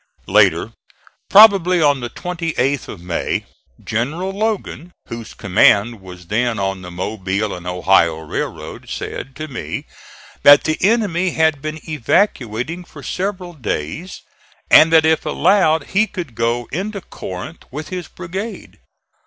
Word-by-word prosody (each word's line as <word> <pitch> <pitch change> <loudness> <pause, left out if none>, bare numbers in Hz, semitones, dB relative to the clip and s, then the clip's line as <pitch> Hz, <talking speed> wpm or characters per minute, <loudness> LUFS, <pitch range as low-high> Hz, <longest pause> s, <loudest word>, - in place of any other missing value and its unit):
Later, - - +3 0.6
probably 195 -4 +7
on 145 -3 +3
the 120 -1 -5
28th 165 -4 -2
of - - -9
May, 90 -1 -2 0.4
General 150 +12 -2
Logan, 200 -4 -3 0.2
whose 115 -1 -8
command 105 +2 +3
was 90 -2 -12
then 115 +5 0
on 95 -1 -2
the 90 - -8
Mobile 95 +2 -3
and 90 0 -8
Ohio 90 -2 +3
railroad, 80 -1 -6
said 135 +1 -6
to 155 +1 -6
me 130 -5 -5 0.6
that 145 0 +8
the 155 0 -1
enemy 190 -4 +1
had 160 -3 +2
been 155 +1 -5
evacuating 150 - 0
for - - -13
several 185 -2 -4
days 140 - -5 0.5
and 160 +1 +8
that 160 -1 +6
if 160 0 +2
allowed 165 -3 +2
he 210 +3 +2
could 175 - -7
go 115 +1 -1
into 200 +3 -4
Corinth 95 - -8
with 150 +4 -7
his 180 -2 -5
brigade. 190 +5 -7
150 Hz, 135 wpm, -19 LUFS, 110-180 Hz, 0.6 s, that